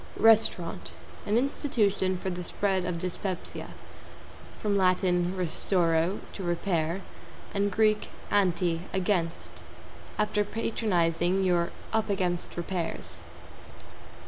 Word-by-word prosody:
=RESTAURANT= 175 - +3 0.3
An 210 +2 +3
institution 215 -8 +1
for 190 +1 -3
the 180 0 -4
spread 190 0 0
of 180 -1 -2
dyspepsia. 185 +1 -3 0.9
From 205 -1 0
Lat. 185 -2 +4
restauro, 180 -1 +1
to - - -7
repair, 175 0 0 0.5
and 200 0 +1
Grk. 215 +1 +3 0.3
anti, 175 -4 +2
against. 180 -3 0 0.7
After 210 0 +2
patronizing, 190 -5 +1
you're 175 -2 +2 0.2
"up 220 -1 +1
against 180 -4 -1
repairs." 175 0 -3
185 Hz, 95 wpm, -28 LUFS, 175-205 Hz, 0.9 s, Lat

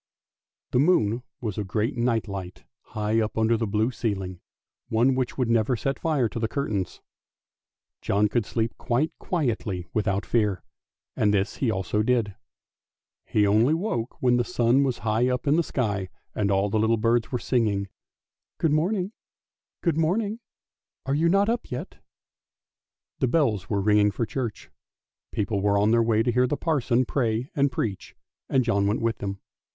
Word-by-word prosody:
The 125 - +2
moon 125 - +3 0.2
was 110 -4 -3
a - - -1
great 110 +7 -1
night 120 -2 0
light 95 -3 -7 0.3
high 105 +1 +1
up 110 0 -3
under 110 +1 +3
the 115 0 -1
blue 110 +4 +1
ceiling, 95 -6 -3 0.5
one 120 +4 +3
which 130 -1 -2
would 125 -3 +1
never 115 +1 +2
set 135 +4 -2
fire 150 -7 +1
to 115 - -5
the 110 - 0
curtains. 110 -8 -3 1.0
John 105 +1 +2
could 115 +2 0
sleep 115 0 -1
quite 130 +7 0
quietly 110 - -2
without 100 -2 0
fear, 105 -5 0 0.5
and 105 - +2
this 100 +1 0
he 130 - 0
also 105 0 0
did. 115 -3 +1 0.9
He 105 - +2
only 110 +9 +4
woke 150 - -3
when 125 -1 +4
the 120 - +2
sun 120 +3 +2
was 130 -3 0
high 115 +3 +2
up 125 +2 -1
in 145 +1 +3
the 170 - +4
sky 105 - -2 0.2
and 100 -2 0
all 100 +1 +2
the 110 - +1
little 110 +1 +3
birds 115 +1 +1
were 125 - 0
singing, 105 -6 0 0.4
" - - -66
Good 160 - +2
morning! 180 +5 0 0.7
Good 170 -4 +1
morning! 205 +7 0 0.7
Are 135 - 0
you 160 +4 +3
not 195 +3 +3
up 235 +1 -1
yet? 125 - -6 0.6
" - - -64
The 130 - +2
bells 120 - +1
were 100 - +1
ringing 105 0 +4
for 115 +3 -2
church; 120 -3 -5 0.6
people 100 -1 -1
were 100 0 +2
on 105 +2 +3
their 115 0 +4
way 115 -1 +2
to 120 - +1
hear 125 +2 +3
the 145 - -1
parson 130 -6 +1
pray 120 0 -1
and 140 -1 +2
preach, 100 -6 -4 0.3
and 130 -1 +3
John 100 -4 +1
went 105 - 0
with 115 -1 0
them. 100 -1 -4
115 Hz, 175 wpm, -25 LUFS, 105-130 Hz, 1.0 s, only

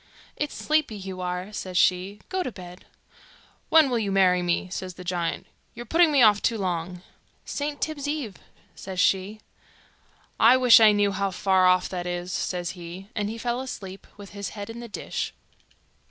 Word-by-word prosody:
'It's 295 -1 -3
sleepy 305 -7 0
you 190 -2 -7
are,' 180 +3 -4
says 185 -3 -4
she; 190 +3 +2
'go 375 0 -2
to 300 - -3
bed.' 180 -2 -12 0.8
'When 320 -2 +6
will 245 -3 0
you 205 -3 -2
marry 185 -2 +4
me?' 175 +1 0
says 185 -1 -5
the 180 - -10
giant. 175 -2 -2 0.3
'You're 240 +1 -7
putting 330 +5 +4
me 275 -4 +5
off 210 -2 +5
too 230 - +1
long.' 180 -2 -3 0.4
'St. 290 0 -4
Tibb's 290 -3 -3
Eve,' 290 -10 -3 0.4
says 190 -1 -7
she. 195 +3 +1 1.0
'I 235 +3 +7
wish 250 -3 +7
I 220 -1 +7
knew 205 -1 +2
how 200 0 -1
far 190 0 +2
off 185 0 +3
that 180 -1 -4
is,' 175 +1 -4
says 175 -1 -2
he; 180 +2 -10
and 205 -1 -1
he 225 - -5
fell 240 +2 -2
asleep, 195 -7 -8
with 200 -1 -11
his 200 -2 -5
head 205 +2 -6
in 230 - -9
the 240 - -8
dish. 215 - -5
200 Hz, 185 wpm, -25 LUFS, 180-235 Hz, 1.0 s, I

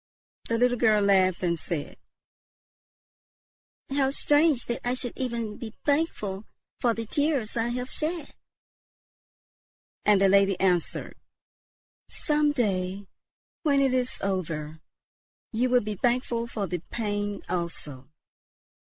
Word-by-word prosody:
The 230 - +2
little 245 0 +2
girl 215 -3 +4
laughed 190 -2 +3
and 170 -2 +1
said, 155 -3 -4 2.0
"How 270 -1 +2
strange 290 -1 +3
that 235 - -2
I 245 +1 +1
should 245 -2 -4
ever 235 -4 -3
be 220 -1 -8
thankful 225 -10 0 0.3
for 235 -2 +2
the 230 - -4
tears 285 -2 0
I 230 0 +1
have 250 +1 -3
shed!" 315 -1 -3 1.7
And 210 -2 +5
the 195 - +5
lady 195 -1 +4
answered, 180 -3 0 0.9
"Some 300 -1 +2
day, 195 -6 -1 0.6
when 285 -3 +3
it 270 -2 +3
is 255 -1 0
over, 160 -5 -3 0.7
you 245 +3 +1
will 250 0 +4
be 210 0 -3
thankful 240 0 0
for 215 -4 -3
the 180 -1 -3
pain 205 -2 -2
also." 160 -7 -4
225 Hz, 120 wpm, -27 LUFS, 190-255 Hz, 2.0 s, And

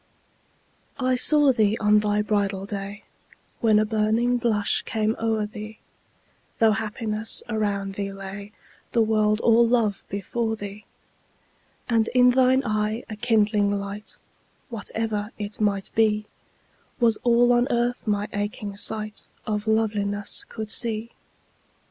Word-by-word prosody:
I 255 -1 +2
saw 290 +2 +5
thee 220 -3 +2
on 210 0 +4
thy 210 0 0
bridal 200 -2 -1
day 200 0 -5 0.6
When 220 -3 +4
a 215 - +3
burning 220 +3 +1
blush 220 -4 +1
came 220 0 -1
o'er 220 -1 0
thee, 215 +1 -9 0.8
Though 225 -1 +4
happiness 215 0 -1
around 205 -3 -2
thee 200 0 -4
lay, 195 +1 -8 0.4
The 230 - +4
world 215 -1 +2
all 235 0 +5
love 230 -4 +1
before 220 +3 -2
thee: 205 0 -8 1.0
And 225 -2 +2
in 250 0 +6
thine 260 +1 +3
eye 215 +1 -1
a - - -4
kindling 210 -2 +2
light 200 +1 -5 0.5
(Whatever 220 -2 -3
it 210 0 -5
might 200 -2 0
be) 215 -1 +2 0.7
Was 230 -3 +3
all 240 0 +3
on 240 +1 +3
Earth 240 0 0
my 205 0 0
aching 205 0 -4
sight 215 0 -1 0.2
Of 210 0 -3
Loveliness 205 -2 0
could 220 -2 -5
see. 230 -1 +1
215 Hz, 130 wpm, -24 LUFS, 205-230 Hz, 1.0 s, in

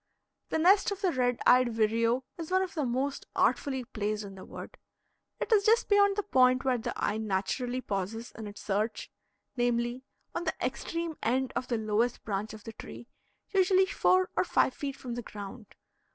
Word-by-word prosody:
The - - 0
nest 380 +7 +5
of 400 -1 -5
the 375 -3 +2
red 245 -3 +1
eyed 250 0 +6
vireo 230 +3 +2
is 330 -2 -6
one 375 +1 +3
of 370 - -5
the 300 -5 -1
most 265 +3 -2
artfully 265 -2 +1
placed 215 -3 -3
in 200 -1 -8
the 190 - -10
wood. - - -10 0.6
It - - -3
is 420 -3 +5
just 450 +3 +3
beyond 405 -1 +5
the 415 - -1
point 255 -7 +4
where 255 -2 +2
the 240 +1 -3
eye 210 - -1
naturally 220 +5 -1
pauses 210 +2 -4
in 220 -1 -7
its 205 0 -10
search; 215 +2 -2 0.4
namely, 240 0 0 0.3
on 345 - -3
the 320 - -1
extreme 320 +6 -3
end 255 +3 0
of 255 - -2
the 235 - 0
lowest 220 +2 0
branch 210 0 -3
of 215 - -13
the 225 - -8
tree, 235 - -10 0.4
usually 380 -1 +4
four 370 -1 +2
or - - +3
five 260 - +2
feet 275 0 -4
from 250 -3 -6
the 240 - -3
ground. 210 0 -9
250 Hz, 190 wpm, -30 LUFS, 220-320 Hz, 0.6 s, eyed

